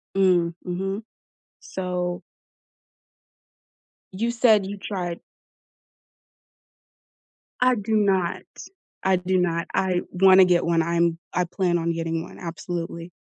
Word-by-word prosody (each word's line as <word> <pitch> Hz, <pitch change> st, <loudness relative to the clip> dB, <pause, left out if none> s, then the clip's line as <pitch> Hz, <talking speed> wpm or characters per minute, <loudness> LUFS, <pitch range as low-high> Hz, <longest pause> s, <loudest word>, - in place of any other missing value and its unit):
Mm, 180 Hz, -3 st, +3 dB
mhm. 195 Hz, +4 st, -3 dB, 0.6 s
So 180 Hz, -1 st, -3 dB, 1.9 s
you 230 Hz, +5 st, 0 dB
said 230 Hz, -3 st, +4 dB
you 200 Hz, +1 st, -6 dB
tried 180 Hz, -4 st, -4 dB, 2.4 s
I 255 Hz, 0 st, +4 dB
do 220 Hz, 0 st, -1 dB
not. 190 Hz, -4 st, +1 dB, 0.6 s
I 190 Hz, -1 st, +4 dB
do 185 Hz, +1 st, 0 dB
not, 170 Hz, -2 st, 0 dB
I 185 Hz, -2 st, +1 dB
wanna 190 Hz, 0 st, +6 dB
get 180 Hz, -1 st, +3 dB
one, 170 Hz, -1 st, +2 dB
I’m 170 Hz, 0 st, +1 dB, 0.2 s
I 180 Hz, -, +2 dB
plan 175 Hz, 0 st, 0 dB
on 170 Hz, 0 st, -1 dB
getting 165 Hz, 0 st, -2 dB
one, -, -, -12 dB
absolutely. 170 Hz, 0 st, -5 dB
180 Hz, 110 wpm, -24 LUFS, 170-195 Hz, 2.4 s, wanna